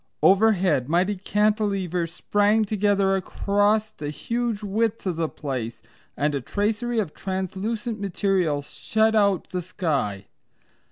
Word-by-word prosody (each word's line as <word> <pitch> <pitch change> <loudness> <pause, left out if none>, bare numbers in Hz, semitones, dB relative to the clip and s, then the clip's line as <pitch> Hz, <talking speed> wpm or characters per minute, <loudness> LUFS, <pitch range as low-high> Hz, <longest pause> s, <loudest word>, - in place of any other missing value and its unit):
Overhead 190 - +4
mighty 180 +5 +2
cantilevers 195 -4 0
sprang 205 +4 +2
together 200 -2 +2
across 205 +3 +1
the 150 -8 -6
huge 230 +6 -2
width 220 +2 -1
of 185 -3 -1
the 165 -2 0
place, 130 -6 -5 0.3
and 145 +2 +1
a 140 - -1
tracery 220 - -1
of 200 -9 -1
translucent 200 +4 -3
material 185 -6 0
shut 220 +9 0
out 200 -4 +2
the 180 - -2
sky. 140 - -2
195 Hz, 120 wpm, -24 LUFS, 170-215 Hz, 0.3 s, Overhead